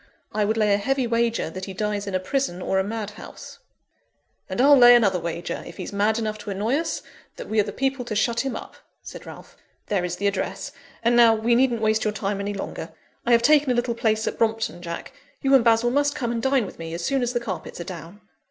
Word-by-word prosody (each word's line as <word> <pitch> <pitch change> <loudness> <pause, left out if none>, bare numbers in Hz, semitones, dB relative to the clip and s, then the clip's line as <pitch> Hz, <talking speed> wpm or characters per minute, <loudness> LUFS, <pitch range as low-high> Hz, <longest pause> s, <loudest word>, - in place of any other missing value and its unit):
I 210 -1 0
would 220 +2 0
lay 210 -2 +3
a 200 - +2
heavy 270 +4 0
wager 230 -6 0
that 185 +2 -6
he 195 - -7
dies 205 0 -2
in 195 - -3
a - - +2
prison 185 -2 -2
or 190 +1 0
a - - +2
madhouse." 210 0 -7 0.9
"And - - -4
I'll 285 +3 +7
lay 245 -2 +8
another 200 -6 +3
wager, 170 +1 -4
if - - -11
he's - - -6
mad 210 +2 +1
enough 215 -2 -3
to 210 - -8
annoy 210 +7 0
us, 325 +1 -3 0.3
that - - -8
we 220 - 0
are - - +5
the 205 - -5
people 270 +2 -1
to 225 -3 -4
shut 235 +3 +1
him 265 -3 -2
up," - - -9 0.3
said - - -10
Ralph. - - -12 0.3
"There 195 -4 +1
is 175 -1 -2
the 200 - -4
address. 200 0 -2 0.3
And 235 +1 +3
now, 230 -2 +6
we 225 +2 +1
needn't 240 -2 +2
waste 220 0 +2
your 215 - 0
time 200 -1 -2
any 200 +1 -3
longer. 195 - -6 0.4
I - - +3
have 235 0 +5
taken 295 -2 +5
a 250 - +2
little 240 0 0
place 220 -2 0
at - - -3
Brompton, 225 -4 0
Jack, 170 -1 -6 0.3
you 270 0 +3
and 265 -3 +6
Basil 230 +1 +3
must 285 +2 +1
come 240 -2 -2
and 230 -1 -2
dine 265 -3 +2
with 185 - -11
me, 165 0 -5
as 170 0 -4
soon 275 -1 +1
as 245 0 -1
the 240 - +1
carpets 200 -8 -6
are - - -4
down." 170 +3 -9
220 Hz, 245 wpm, -24 LUFS, 200-240 Hz, 0.9 s, lay